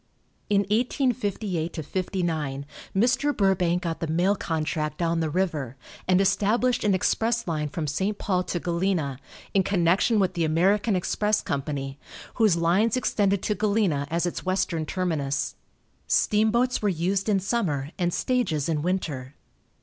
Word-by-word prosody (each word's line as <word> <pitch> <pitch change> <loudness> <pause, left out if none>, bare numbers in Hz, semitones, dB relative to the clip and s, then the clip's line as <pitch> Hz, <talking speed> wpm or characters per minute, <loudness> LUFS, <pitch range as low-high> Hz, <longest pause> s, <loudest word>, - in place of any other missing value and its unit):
In 200 -1 +4
1858 205 - -1
59 160 -7 -2 0.3
Mr. 255 +7 +2
Burbank 180 -3 +2
got 165 -2 -3
the 165 - -2
mail 175 +6 +2
contract 155 -3 -2
down 170 -1 0
the 160 -1 0
river, 150 -7 -1 0.3
and 185 0 +4
established 210 +5 +2
an 205 -2 +3
express 230 +5 0
line 155 -3 -1
from 155 +1 -3
St. 190 +8 -1
Paul 185 -3 0
to 175 - -2
Galena, 170 -6 -1 0.3
in 195 - +4
connection 190 +4 +2
with 185 -2 +1
the 170 -2 0
American 195 +7 +2
Express 210 +3 0
Company, 140 -1 -3 0.4
whose 215 -7 +4
lines 190 +8 +2
extended 200 -5 +1
to 210 - +1
Galena 200 -9 +1
as 170 +2 0
its 175 - -3
western 185 -4 -1
terminus. 155 -7 -1 0.5
Steamboats 225 +4 +2
were 210 - +2
used 190 +4 0
in 200 -2 +3
summer 180 - -1
and 175 -1 +1
stages 185 - 0
in 155 -3 0
winter. 150 -7 -3
180 Hz, 140 wpm, -25 LUFS, 160-205 Hz, 0.5 s, In